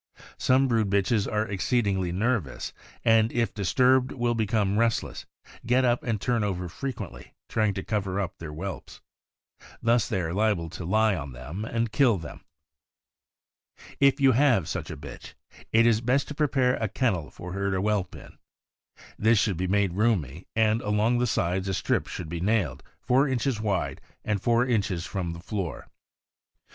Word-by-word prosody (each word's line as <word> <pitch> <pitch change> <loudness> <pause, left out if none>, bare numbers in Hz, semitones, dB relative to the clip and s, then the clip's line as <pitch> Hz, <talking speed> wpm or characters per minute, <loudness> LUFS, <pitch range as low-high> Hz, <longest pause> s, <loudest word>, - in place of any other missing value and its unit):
Some 130 +1 +3
brood 115 -4 +1
bitches 100 +2 +1
are 105 0 +1
exceedingly 100 -3 0
nervous, 100 - -1 0.3
and 115 0 +4
if 115 -1 0
disturbed 125 +7 +3
will 120 -1 0
become 110 -2 +1
restless, 115 -1 -1 0.4
get 125 +2 +3
up 120 0 +2
and 115 -4 -2
turn 120 +1 0
over 90 -3 -2
frequently, 115 - -7
trying 110 -3 0
to 95 - -3
cover 100 -3 -2
up 95 -3 -4
their 80 - -7
whelps. 85 +2 -7 0.8
Thus 115 -1 +2
they 95 - 0
are 85 -1 -3
liable 100 -5 0
to 90 - -7
lie 110 +3 +3
on 75 -5 -6
them 75 - -6
and 115 0 -1
kill 125 -6 +4
them. 80 -4 -9 1.6
If 140 0 +4
you 135 -1 +5
have 120 - +3
such - - -4
a - - -6
bitch, 70 0 -10 0.4
it 115 +1 +5
is 115 -2 +3
best 125 +4 +1
to - - -4
prepare 135 -4 +1
a 110 - -1
kennel 100 -7 -1
for 90 +1 -9
her 100 0 -1
to 95 -1 0
whelp 100 -2 -1
in. - - -13 0.8
This 110 +2 +4
should 100 -3 +1
be 90 +2 -1
made 100 -1 +1
roomy, 90 - 0
and 110 0 +2
along 105 +4 +1
the 125 - +1
sides 95 -2 0
a 95 - -1
strip - - 0
should 85 - -6
be 85 +1 -5
nailed, 95 - 0 0.2
four 130 +3 +3
inches 125 -3 -1
wide, 100 -4 -1 0.2
and 105 -3 -1
four 120 +1 +3
inches 100 -8 0
from 90 -4 -3
the 85 - -8
floor. 95 -1 -5
105 Hz, 170 wpm, -26 LUFS, 95-120 Hz, 1.6 s, you